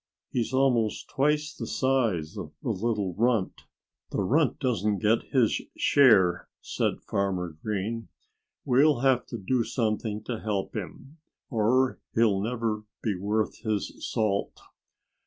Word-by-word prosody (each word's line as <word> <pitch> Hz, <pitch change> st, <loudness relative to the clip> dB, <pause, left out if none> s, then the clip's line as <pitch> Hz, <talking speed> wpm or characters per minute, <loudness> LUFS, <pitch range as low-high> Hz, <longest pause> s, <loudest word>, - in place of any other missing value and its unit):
He's 120 Hz, -1 st, -1 dB
almost 130 Hz, -5 st, +1 dB
twice 150 Hz, +2 st, +1 dB
the -, -, -6 dB
size 115 Hz, -, 0 dB
of 75 Hz, -8 st, -7 dB
the 120 Hz, -, 0 dB
little 105 Hz, -2 st, -1 dB
runt." 115 Hz, -1 st, 0 dB, 0.4 s
"The -, -, -1 dB
runt 145 Hz, -, +2 dB
doesn't 105 Hz, -6 st, 0 dB
get 110 Hz, +3 st, +1 dB
his 125 Hz, -5 st, +2 dB, 0.2 s
share," 95 Hz, -11 st, +4 dB
said -, -, -2 dB
Farmer 95 Hz, -5 st, -1 dB
Green. 110 Hz, +2 st, -3 dB, 0.6 s
"We'll 135 Hz, 0 st, +4 dB
have 130 Hz, -2 st, +2 dB
to 120 Hz, -, -5 dB
do 115 Hz, +4 st, 0 dB
something 110 Hz, -2 st, -2 dB
to 115 Hz, 0 st, -4 dB
help 105 Hz, -3 st, -3 dB
him, 140 Hz, +4 st, -7 dB, 0.3 s
or 125 Hz, +3 st, +2 dB, 0.2 s
he'll 110 Hz, -4 st, +3 dB
never 115 Hz, -1 st, -1 dB, 0.2 s
be 110 Hz, -, +1 dB
worth 105 Hz, +4 st, -1 dB
his 110 Hz, -3 st, -2 dB
salt." 105 Hz, -3 st, -1 dB
110 Hz, 130 wpm, -27 LUFS, 100-125 Hz, 0.6 s, share